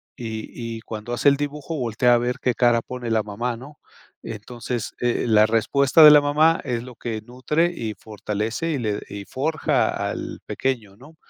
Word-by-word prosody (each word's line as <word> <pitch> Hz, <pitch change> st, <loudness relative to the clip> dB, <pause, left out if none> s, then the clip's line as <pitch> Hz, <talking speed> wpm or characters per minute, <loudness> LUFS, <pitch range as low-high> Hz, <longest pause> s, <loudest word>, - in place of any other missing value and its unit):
Y 110 Hz, -2 st, -6 dB, 0.3 s
y -, -, -10 dB
cuando 110 Hz, +2 st, -6 dB
hace 130 Hz, +4 st, +4 dB
el 140 Hz, -, +2 dB
dibujo 145 Hz, +2 st, -4 dB
voltea 120 Hz, -1 st, +2 dB
a -, -, +5 dB
ver 125 Hz, +1 st, -1 dB
qué 125 Hz, -, +1 dB
cara 120 Hz, 0 st, +3 dB
pone 125 Hz, 0 st, -6 dB
la 110 Hz, -1 st, +2 dB
mamá, 115 Hz, +4 st, -3 dB
¿no? 145 Hz, +5 st, -13 dB, 0.4 s
Entonces, 115 Hz, +1 st, -5 dB
eh, 120 Hz, -1 st, 0 dB
la 110 Hz, -2 st, +5 dB
respuesta 135 Hz, +7 st, +4 dB
de 150 Hz, -, +12 dB
la 150 Hz, 0 st, +8 dB
mamá 155 Hz, +3 st, +3 dB
es 120 Hz, -3 st, -2 dB
lo 125 Hz, -1 st, -11 dB
que 110 Hz, -1 st, -5 dB
nutre 150 Hz, +8 st, 0 dB
y 110 Hz, -8 st, -4 dB
fortalece 110 Hz, -, -3 dB
y 150 Hz, -, -1 dB
le 105 Hz, -3 st, -1 dB
y 100 Hz, 0 st, -7 dB
forja 150 Hz, +7 st, 0 dB, 0.2 s
al -, -, -6 dB
pequeño, 115 Hz, -7 st, -3 dB
¿no?, 145 Hz, +7 st, -16 dB
120 Hz, 185 wpm, -23 LUFS, 110-140 Hz, 0.4 s, de